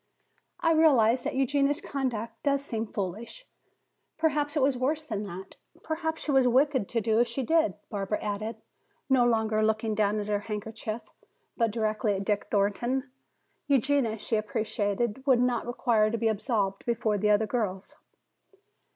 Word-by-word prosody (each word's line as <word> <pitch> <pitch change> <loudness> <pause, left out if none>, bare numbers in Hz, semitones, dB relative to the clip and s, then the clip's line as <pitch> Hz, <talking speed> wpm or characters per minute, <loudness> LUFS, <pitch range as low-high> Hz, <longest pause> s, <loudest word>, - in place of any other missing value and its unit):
"I 330 - +3
realize 260 -7 +4
that - - -2
Eugenia's 280 +2 +2
conduct 235 -7 -4
does 280 -1 0
seem 225 -4 -3
foolish. 210 - -5 0.7
Perhaps 300 -1 0
it - - +2
was 270 0 +3
worse 290 +5 -1
than 215 -8 -4
that; 190 +1 -9 0.3
perhaps 320 0 -3
she 300 - -1
was 265 -2 +4
wicked 260 -3 +2
to 230 - 0
do 220 +1 +2
as 240 - +3
she 240 +3 -3
did," 320 - +2 0.2
Barbara 205 0 -2
added, 215 +2 -3 0.6
no 260 -2 +5
longer 220 -2 +1
looking 220 0 +1
down 210 0 +1
at 205 - -3
her 205 0 0
handkerchief, 215 +2 -5 0.5
but 230 -2 +2
directly 215 -1 0
at 195 +1 -4
Dick 205 -1 0
Thornton. 240 +6 0 0.6
Eugenia, 270 -4 +2
she 220 +1 -1
appreciated, 215 +2 -2
would 255 -3 +5
not 245 -1 +1
require 230 -3 +2
to 230 - -2
be 225 0 +1
absolved 205 -3 -1
before 225 -3 0
the 210 +2 +2
other 210 +1 +4
girls. 205 -4 -3
230 Hz, 160 wpm, -28 LUFS, 210-265 Hz, 0.7 s, no